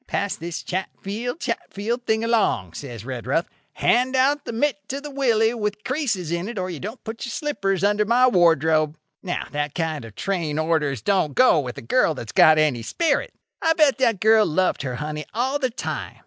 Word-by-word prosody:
'Pass 200 0 -1
this 170 +1 -6
chatfield 205 - -4
chatfield 235 - -3
thing 220 0 +1
along,' 220 - +1
says 120 0 -8
Redruth;—'hand 165 - -1
out 275 +3 +2
the - - -4
mitt 230 -4 -1
to 275 - -3
the 290 +1 -8
Willie 235 -5 +2
with 210 -2 -3
creases 245 - -2
in 170 +4 -2
it 235 - -7
or 185 -1 -2
you 165 - -6
don't 215 +6 -7
put 225 0 -6
your - - -4
slippers 200 -9 -2
under 205 +1 +3
my 240 +4 +4
wardrobe.' 160 - +3 0.2
"Now 180 -2 -3
that 150 0 -3
kind 160 -5 -2
of 110 -3 -11
train 170 -6 -2
orders 155 -7 0
don't 170 -5 +1
go 255 -10 +5
with 125 -4 -5
a - - -8
girl 160 - +2
that's 115 -4 -7
got 155 0 +6
any 150 -6 +2
spirit. 325 - -1 0.3
I 325 - +3
bet 300 -4 +3
that 230 -6 +2
girl 220 0 +5
loved 180 +3 +1
her 130 -3 -3
honey 150 +2 -5
all 260 +5 0
the 260 -3 0
time. 240 - -5
195 Hz, 190 wpm, -23 LUFS, 155-240 Hz, 0.3 s, got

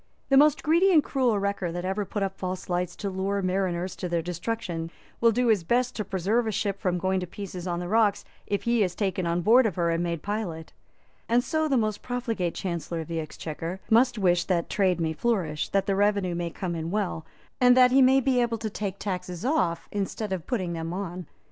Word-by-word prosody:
The 275 - +4
most 300 +1 +5
greedy 340 +5 +4
and 310 -5 +5
cruel 255 -7 +1
wrecker 200 -3 -1
that 175 +1 -4
ever 195 +2 -1
put 200 +1 -3
up 195 0 -2
false 185 -1 -5
lights 180 0 -1
to 200 - -4
lure 195 +1 -1
mariners 185 -1 -1
to 180 - -4
their 170 -1 0
destruction 175 -1 -3 0.3
will 230 0 +5
do 245 +3 +1
his 210 -6 +3
best 245 +7 +1
to 215 - -2
preserve 200 +5 0
a - - 0
ship 200 -1 -2
from 180 -3 0
going 190 +1 0
to 180 - -5
pieces 185 -1 -7
on 175 -1 -1
the 175 - -4
rocks, 215 0 +2 0.2
if 200 - -1
he 235 -1 +2
is 180 -3 0
taken 190 -3 -1
on 170 +1 0
board 235 +5 +6
of 195 - -4
her 170 -2 +1
and 165 0 0
made 170 -2 -2
pilot; 195 -6 -4 0.6
and 240 +1 +3
so 315 +2 0
the 275 -3 +2
most 215 -2 -1
profligate 230 -8 -2
Chancellor 170 -2 -3
of 160 - -9
the 165 -1 -2
Exchequer 165 +3 -5
most 240 +2 +4
wish 180 -3 +2
that 175 -3 -1
trade 185 -4 +2
may 160 -1 0
flourish, 165 -5 -1
that 195 -1 +1
the 195 -1 +1
revenue 200 -2 +2
may 170 0 -2
come 175 +1 -4
in 165 0 -3
well, 190 -4 -2 0.4
and 250 0 +6
that 250 -1 +7
he 270 +1 +5
may 265 +1 +6
be 260 -1 +2
able 235 -1 0
to 220 -1 -4
take 200 -2 -4
taxes 180 -1 -4
off 180 - 0
instead 205 0 -3
of 180 -4 -5
putting 185 -8 -1
them 165 0 -4
on. 180 -2 -5
195 Hz, 225 wpm, -26 LUFS, 175-225 Hz, 0.6 s, that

